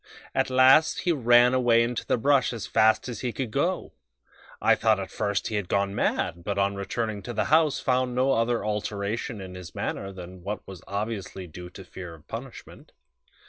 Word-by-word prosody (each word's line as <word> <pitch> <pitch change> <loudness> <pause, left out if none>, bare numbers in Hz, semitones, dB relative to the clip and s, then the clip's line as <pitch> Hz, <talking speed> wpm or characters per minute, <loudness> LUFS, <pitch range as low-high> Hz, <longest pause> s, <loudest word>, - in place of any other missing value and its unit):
At - - +1
last 130 +4 +5
he 180 - +1
ran 120 -3 +5
away 120 -2 +4
into 120 0 -3
the - - +2
brush 135 +1 +2
as 110 -3 -5
fast 110 +2 +3
as 120 - -5
he 125 - -2
could 125 -2 -4
go. - - -1 0.7
I - - +4
thought - - +2
at - - -6
first 105 -2 -1
that - - -3
he 110 - -3
had 100 -3 -4
gone 100 0 +1
mad, 85 -3 -1
but 100 +2 -3
on 100 0 +2
returning 105 +2 -3
to 120 +5 -6
the 110 - 0
house 155 -3 +4
found 125 -1 0
no 130 +2 +2
other 115 -1 +1
alteration 105 +1 -3
in 95 -1 -8
his 90 -3 -10
manner 100 0 -3
than 90 -1 -10
what 100 +4 -5
was 95 -4 -9
obviously 100 -2 -4
due 90 +1 -10
to 95 +2 -11
fear 90 -2 -9
of 75 - -20
punishment. 120 +3 -9
110 Hz, 200 wpm, -26 LUFS, 100-125 Hz, 0.7 s, last